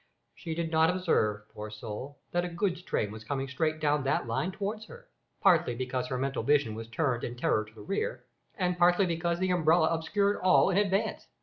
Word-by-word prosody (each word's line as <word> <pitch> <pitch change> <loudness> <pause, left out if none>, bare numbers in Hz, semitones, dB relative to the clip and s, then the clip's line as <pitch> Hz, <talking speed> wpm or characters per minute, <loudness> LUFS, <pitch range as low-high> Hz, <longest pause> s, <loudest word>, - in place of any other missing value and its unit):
She 165 -3 -6
did 165 -1 -2
not 160 0 +4
observe, 110 - 0
poor 105 0 -6
soul, 110 +6 -7
that 175 0 +1
a - - -2
goods 175 +1 -1
train 105 - -2
was 110 0 -9
coming 135 +3 -3
straight 155 +4 -1
down 150 -2 +1
that 135 - 0
line 115 +11 -1
towards 210 +3 -4
her, 485 +1 -13 0.3
partly 170 -9 +4
because 130 0 -2
her 130 - -2
mental 135 +1 -1
vision 140 -6 +2
was 115 +1 -7
turned 120 0 -1
in 120 - -4
terror 110 -3 +1
to 110 +1 -17
the 105 - -11
rear, 460 - -3 0.3
and 180 -3 -1
partly 175 +2 +5
because 170 0 -1
the 185 +1 0
umbrella 160 -1 +4
obscured 200 +5 +1
all 185 +1 +4
in 185 - +1
advance. 200 0 0
160 Hz, 205 wpm, -29 LUFS, 125-180 Hz, 0.3 s, partly